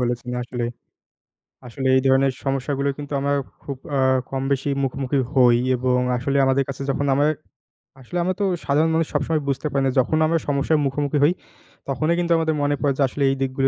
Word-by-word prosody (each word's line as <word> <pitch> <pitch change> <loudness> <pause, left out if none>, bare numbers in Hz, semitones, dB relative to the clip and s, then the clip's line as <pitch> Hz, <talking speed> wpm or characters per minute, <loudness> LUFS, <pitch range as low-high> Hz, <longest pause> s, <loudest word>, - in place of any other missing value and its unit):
বলেছেন, 125 0 -2
আসলে। 120 0 -4 1.0
আসলে 130 +3 -5
এই - - +5
ধরনের 135 0 +4
সমস্যা 135 +1 -1
গুলোই 140 0 0
কিন্তু 145 0 -7
আমরা 140 +1 0 0.3
খুব 140 - -6 0.2
আ - - +2 0.3
কমবেশি 135 +1 -1 0.2
মুখোমুখি 135 +1 -1 0.2
হই। 125 -3 +5 0.2
এবং 125 0 +1 0.2
আসলে 135 +3 -1
আমাদের 135 +1 +2
কাছে 135 0 -5
যখন 140 +1 -1
আমার 145 +3 +2 0.7
আসলে 155 +8 -6
আমরা 185 +2 0
তো 200 - +2 0.2
সাধারণ 150 +3 +2
মানুষ 165 -1 +1
সবসময় 150 +2 0
বুঝতে 140 +2 -1
পারি 135 -1 0
না, 130 - +2
যখন 130 +5 +1
আমরা 165 +1 +1
সমস্যার 145 +2 +1
মুখোমুখি 145 +2 -1
হই, 155 +4 +5 0.5
তখনই 155 +5 0
কিন্তু 170 -1 -1
আমাদের 160 -1 0
মনে 145 0 +1
পড়ে, 140 -2 +2
যে, - - -1
আসলে 140 +2 -3
এই 135 - -1
দিকগুলো 135 0 +1
140 Hz, 190 wpm, -22 LUFS, 130-145 Hz, 1.0 s, এই